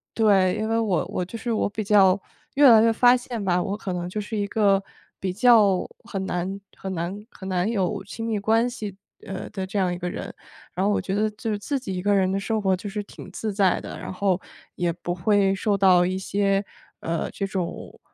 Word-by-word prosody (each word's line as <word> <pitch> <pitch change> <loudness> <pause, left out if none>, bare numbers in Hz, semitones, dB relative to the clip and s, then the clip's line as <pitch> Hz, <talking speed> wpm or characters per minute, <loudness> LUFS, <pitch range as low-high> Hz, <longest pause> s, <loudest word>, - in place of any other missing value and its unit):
对， 195 -5 +4
因 215 - -2
为 225 +1 +1
我 205 -6 +1
我 180 - -3
就 185 +6 -7
是 235 0 -2
我 215 - 0
比 210 +1 -4
较 195 -2 +5 0.4
越 280 -1 +7
来 225 -2 +8
越 230 0 +4
发 245 +2 +5
现 245 -2 -5
吧， 180 -2 +2
我 200 0 -3
可 195 -3 -4
能 175 0 -3
就 210 - -4
是 215 +1 -5
一 205 - 0
个 200 -2 +3 0.4
比 185 -1 -2
较 210 -3 +5 0.2
很 195 -4 -4
难 185 +2 -3 0.2
很 190 -1 -5
难 170 +1 -3 0.2
很 190 - -8
难 185 +3 0
有 200 -2 -1
亲 225 +3 -6
密 220 -2 0
关 225 +4 +2
系， 210 -6 -6 0.3
呃， 190 0 -5
的 195 -2 -4
这 195 - -4
样 180 -2 +1
一 - - -4
个 180 0 -3
人。 - - -6 0.4
然 185 - 0
后 205 - +3
我 - - 0
觉 190 - -3
得 215 +1 +1
就 220 +2 -5
是 210 - -1
自 280 +7 -2
己 210 -7 -5
一 180 - -3
个 205 +1 +2
人 190 -1 +2
的 195 - 0
生 220 +2 -1
活 190 -2 +2
就 205 +3 -6
是 205 +1 -4
挺 200 - -12
自 215 +2 -4
在 195 -2 +2
的， - - -8
然 - - -6
后 190 -1 +1 0.4
也 175 -1 0
不 175 +1 -4
会 195 +2 +2
受 200 +1 0
到 185 -2 +5
一 185 +1 -1
些， 195 +1 0 0.4
呃， 165 0 -2
这 200 - -3
种 190 -3 -5
195 Hz, 250 characters per minute, -24 LUFS, 185-215 Hz, 0.4 s, 来